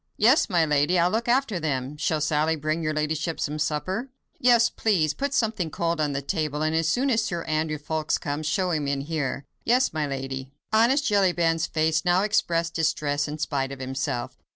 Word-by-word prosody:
"Yes, 245 +8 +4
my 170 -4 +3
lady; 150 +4 +2
I'll 175 +1 +3
look 230 +2 -1
after 240 -6 +1
them. 140 -3 -2
Shall 155 +1 -1
Sally 155 +1 +1
bring 155 +2 -2
your 155 -1 -1
ladyship 155 +1 -2
some 150 +1 -2
supper?" 185 - -2 0.3
"Yes, 240 -2 +5
please. 175 -11 +1
Put 280 0 -2
something 220 - 0
cold 165 +1 -1
on 150 -1 +1
the 140 0 -3
table, 155 -2 -2
and 155 +1 0
as 165 0 +1
soon 260 +10 +1
as 225 -1 +2
Sir 170 -6 -3
Andrew 155 0 -1
Ffoulkes 155 +1 -2
comes, 150 +1 -3
show 185 +2 0
him 150 -3 -1
in 140 -1 -1
here." 145 -2 -3 0.2
"Yes, 250 +2 +2
my 155 -2 -1
lady." 135 -1 -5 0.2
Honest 250 +6 +4
Jellyband's 175 -6 +2
face 155 0 +1
now 180 +2 +3
expressed 170 -5 0
distress 150 -3 0
in 150 +1 -5
spite 140 -3 -2
of 135 - -6
himself. 130 -1 -4
160 Hz, 195 wpm, -25 LUFS, 150-185 Hz, 0.3 s, Yes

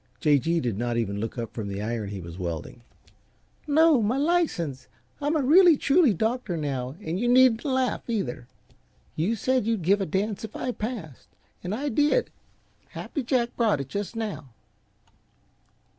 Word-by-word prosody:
J. 150 -4 +4
G. 165 +5 0
did 120 -8 -2
not 120 0 -1
even 100 -3 -1
look 115 +4 -4
up 115 -1 -5
from 110 -3 -5
the 100 0 -4
iron 110 -1 -3
he 100 -2 -6
was 85 +1 -9
welding. 85 +6 -5 0.9
"No, 305 -2 +5
my 220 +5 +1
license. 280 - 0 0.3
I'm 295 +2 0
a 300 - +1
really, 335 +3 +6
truly 290 -1 +4
doctor 220 -1 -1
now, 135 -3 -3
and 165 +3 -3
you 240 - 0
needn't 245 -2 +5
laugh, 260 -3 -1
either. 135 - -3 0.7
You 190 +9 0
said 255 +1 0
you'd 225 -6 0
give 200 +4 +3
a 195 - -1
dance 200 +5 -2
if 220 - -7
I 250 - -2
passed, 210 - -6 0.4
and 185 +4 -2
I 285 +5 -2
did. 295 - +2 0.6
Happy 290 - -5
Jack 240 -1 0
brought 220 - +2
it 135 -1 -5
just 205 +5 -4
now." 210 - -5
205 Hz, 170 wpm, -26 LUFS, -, 0.9 s, really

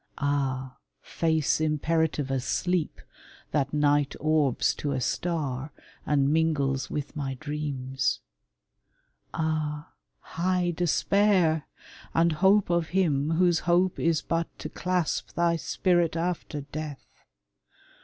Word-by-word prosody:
Ah, 135 -2 -1 0.3
face 160 -2 +1
imperative 155 -2 0
as 130 -2 -1
sleep, 180 +2 -1 0.5
that 140 -3 0
night 145 -1 +2
Orbs 155 -4 +2
to 145 -1 -3
a 130 - -1
star, 145 -2 -2 0.4
and 140 -1 +2
mingles 140 -5 +1
with 150 -1 -4
my 135 -2 -3
dreams! 140 -2 -2 1.1
Ah, 155 -2 -2 0.3
high 180 +1 0
despair, 175 -1 +2 0.5
and 165 +1 +4
hope 190 +4 +3
of 170 -2 +1
him 150 -6 +2
whose 175 -1 +3
hope 180 +1 +3
Is 165 -2 +1
but 165 0 -1
to - - -6
clasp 180 -3 -1
thy 170 0 +2
spirit 175 0 +1
after 165 -3 -2
death! 145 0 -7
155 Hz, 110 wpm, -27 LUFS, 145-170 Hz, 1.1 s, and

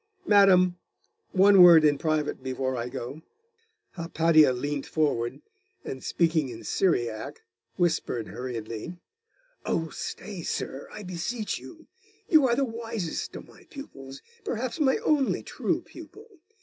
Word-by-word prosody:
Madam, 185 -3 +5 0.5
one 195 0 +6
word 170 -3 +9
in 145 -1 +4
private 155 -4 -1
before 130 0 -2
I 120 0 -3
go.' 135 +3 -7 0.7
Hypatia 165 -3 +3
leant 140 +3 -3
forward, 130 -7 -1 0.4
and 130 - -6
speaking 160 -5 +1
in 115 -2 -9
Syriac, 120 - -1 0.3
whispered 160 - -1
hurriedly 115 - -6 0.7
'Oh, 165 -1 -1
stay, 195 +2 -6
sir, 140 -3 -4
I 210 - -8
beseech 190 +5 -4
you: 325 -1 -13 0.4
You 305 -5 +5
are 235 - +2
the 275 +2 +1
wisest 225 -6 -5
of - - -9
my - - -18
pupils 135 - -10 0.2
perhaps 255 - -3
my 270 -3 +3
only 290 -4 +2
true - - -2
pupil.... 425 +2 -13
165 Hz, 125 wpm, -27 LUFS, 135-210 Hz, 0.7 s, word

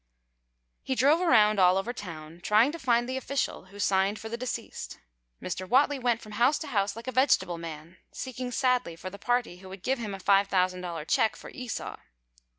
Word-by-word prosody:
He 265 - -2
drove 285 +7 +4
around 215 - +4
all 180 0 +5
over 225 +5 -2
town, 165 -6 -9
trying 215 +8 +4
to 335 - -7
find 240 -3 +2
the 260 +1 -2
official 275 -4 -2
who 200 +2 -15
signed 195 +1 +1
for 225 - -7
the 230 - -3
deceased. 250 +1 -5 0.4
Mr. 185 +1 -5
Whatley 280 +2 +3
went 235 -2 +1
from 215 - -11
house 245 +7 +3
to - - -6
house 200 -2 0
like 230 - -9
a 255 - -3
vegetable 255 -9 +2
man, 165 +1 -8
seeking 255 -1 -5
sadly 250 -8 +1
for 185 +3 -7
the 200 - -10
party 245 -6 0
who 190 +1 -12
would 190 -1 -10
give 265 0 0
him 210 -4 -4
a - - -9
$5,000 185 -4 +1
check 220 - +2
for - - -11
Esau. 250 -2 -5
215 Hz, 195 wpm, -28 LUFS, 185-250 Hz, 0.4 s, all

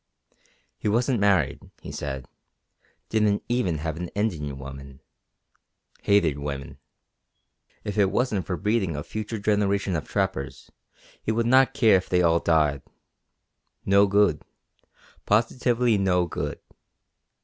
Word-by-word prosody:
He - - -3
wasn't 120 +3 +1
married, 95 -9 +2 0.2
he - - -9
said; 65 -3 -5 0.8
didn't 105 -2 +1
even 120 -10 0
have 80 +1 -4
an 90 +1 -4
Indian 80 -10 -2
woman. 70 0 -10 1.0
Hated 85 -8 +2
women. 70 -1 -6 1.0
If 105 0 -3
it 100 -2 +4
wasn't 105 -5 -1
for 90 - -2
breeding 105 -6 0
a 75 - -4
future 110 +4 -5
generation 100 -2 0
of 75 - -4
trappers 70 0 -3 0.5
he - - -1
would 115 +1 0
not 130 +2 +4
care 110 -7 +5
if 95 - -5
they 90 -1 +2
all 85 0 +4
died. 75 -5 +2 1.0
No 100 +1 +5
good. 100 -5 +3 0.9
Positively 115 +1 +2
no 90 -2 +2
good. 85 - -4
95 Hz, 125 wpm, -25 LUFS, 80-110 Hz, 1.0 s, care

